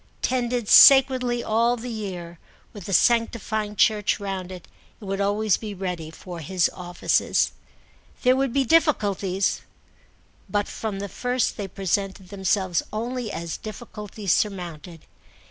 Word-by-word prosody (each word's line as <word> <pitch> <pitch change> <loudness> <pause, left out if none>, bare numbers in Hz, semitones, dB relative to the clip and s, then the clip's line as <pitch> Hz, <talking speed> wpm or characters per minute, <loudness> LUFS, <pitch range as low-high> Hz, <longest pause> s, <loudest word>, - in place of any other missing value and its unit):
Tended 245 -3 -1
sacredly 255 -3 +7
all 235 +2 +2
the 240 +1 -6
year, 180 -6 -6 0.3
with 205 -5 -10
the - - -5
sanctifying 220 0 +1
church 210 0 +2
round 190 -2 -5
it, 180 -2 -10 0.3
it 215 - -11
would 195 +1 -2
always 205 0 +1
be 210 -2 -7
ready 180 -4 -4
for 175 +2 -9
his 175 +3 0
offices. 175 -1 0 0.7
There 255 0 +5
would 270 -1 0
be 275 +1 +1
difficulties, 205 - +1 0.9
but 205 -1 0
from 215 -3 -5
the 200 +1 -4
first 245 +5 -1
they 200 - -5
presented 195 0 -3
themselves 190 -3 0
only 235 +1 -3
as 170 -1 -5
difficulties 210 -3 -4
surmounted. 175 -5 -3
205 Hz, 130 wpm, -24 LUFS, 185-235 Hz, 0.9 s, sacredly